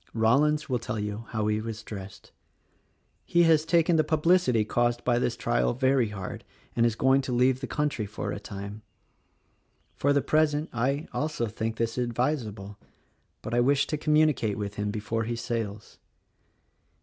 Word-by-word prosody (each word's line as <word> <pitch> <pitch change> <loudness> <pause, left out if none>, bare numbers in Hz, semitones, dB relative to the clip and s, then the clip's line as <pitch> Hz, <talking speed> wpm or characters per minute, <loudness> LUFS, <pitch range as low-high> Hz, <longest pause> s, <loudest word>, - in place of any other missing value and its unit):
Rollins 145 +7 +3
will 125 -4 0
tell 110 -1 -4
you 105 +2 -4
how 110 -2 -2
he 105 0 0
was 110 0 -6
dressed. 95 -2 -9 0.9
He 175 0 +3
has 160 -2 +4
taken 165 0 +3
the 155 - +4
publicity 155 -8 +2
caused 120 +2 0
by 120 -1 +2
the 125 - +1
trial 60 - 0
very 130 -1 +2
hard, 95 -3 -6 0.3
and 115 0 +4
is 115 - -1
going 130 +3 +3
to 130 - -5
leave 125 +1 +3
the 135 - -4
country 145 -8 -1
for 105 - -5
a - - -4
time. 100 +1 -8 1.1
For 140 - +1
the 140 -1 +2
present, 155 0 +1
I. 135 +7 -1
also, 150 -5 -1
think 110 +1 -3
this 115 +1 -1
advisable; 115 -5 -2 0.6
but 115 - -5
I 120 - +3
wish 135 +3 +3
to 155 - -2
communicate 150 -8 +2
with 100 -1 -4
him 105 0 -2
before 110 +2 -2
he 120 +1 -2
sails. 115 -3 -5
120 Hz, 165 wpm, -27 LUFS, 110-145 Hz, 1.1 s, has